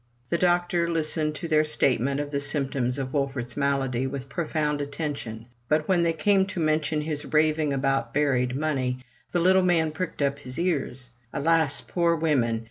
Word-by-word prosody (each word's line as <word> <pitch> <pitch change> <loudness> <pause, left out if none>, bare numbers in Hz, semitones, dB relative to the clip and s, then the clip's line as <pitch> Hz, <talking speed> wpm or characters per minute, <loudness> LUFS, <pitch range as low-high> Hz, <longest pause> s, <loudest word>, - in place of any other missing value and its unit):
The 170 - +1
doctor 175 -1 +2
listened 155 -2 0
to 170 - -5
their 155 -1 +3
statement 140 -3 +1
of 145 0 -4
the 140 - 0
symptoms 135 -3 0
of 130 -1 -4
Wolfert's 135 -4 -2
malady 135 -3 0
with 135 0 -6
profound 150 -1 -1
attention; 140 -6 -5 0.2
but 155 0 +2
when 185 -2 +3
they 170 -1 +2
came 190 +4 +2
to 190 - -5
mention 155 -1 +1
his 150 -1 -3
raving 155 -1 +2
about 135 -3 0
buried 130 -3 +1
money, 135 -4 -1 0.3
the 175 - +1
little 190 +2 +5
man 170 -3 +2
pricked 155 -2 -3
up 140 0 0
his 130 -1 -6
ears. 135 -7 -2 0.2
Alas, 160 0 +2
poor 170 -1 +1
women 135 -8 +1
150 Hz, 170 wpm, -26 LUFS, 135-160 Hz, 0.3 s, little